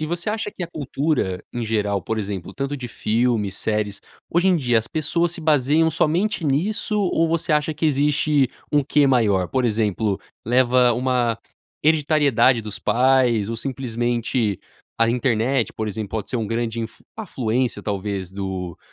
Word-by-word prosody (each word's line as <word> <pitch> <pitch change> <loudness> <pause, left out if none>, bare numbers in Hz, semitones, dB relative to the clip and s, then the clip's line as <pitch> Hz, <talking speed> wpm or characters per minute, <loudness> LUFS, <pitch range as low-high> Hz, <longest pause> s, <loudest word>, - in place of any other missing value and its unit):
E 155 - -2
você 175 +5 -2
acha 215 -1 -3
que 190 - -7
a - - -2
cultura, 140 - -1
em 120 -2 -3
geral, 105 -2 0
por 110 - -2
exemplo, 100 -3 -5
tanto 140 +1 -3
de 130 -3 -6
filmes, 110 -4 0
séries, 105 -2 -2 0.3
hoje 175 +2 +2
em 180 - +4
dia 120 -6 +2
as 110 - -3
pessoas 165 +2 0
se 175 - -5
baseiam 155 +1 +3
somente 170 +3 0
nisso 210 +9 0
ou 165 -4 +1
você 165 0 -1
acha 150 +1 +1
que 155 - -3
existe 145 -1 +2 0.2
um 145 -1 +3
quê 145 0 +3
maior? 105 -8 +2
Por 130 -1 0
exemplo, 105 -2 0 0.3
leva 125 0 +4
uma 125 -1 +1 0.5
hereditariedade 145 -5 +3
dos 105 -1 -6
pais 125 -4 +2
ou 115 - -3
simplesmente 120 -4 -1 0.4
a 115 - +3
internet, 120 0 +1
por 110 -1 -3
exemplo, 105 -1 -5
pode 110 -3 -4
ser - - -1
uma 115 -2 -2
grande 115 0 -2
inf 115 0 -7 0.2
afluência, 130 - -2
talvez, 100 -2 -3
do 95 -3 -5
125 Hz, 165 wpm, -22 LUFS, 110-150 Hz, 0.5 s, em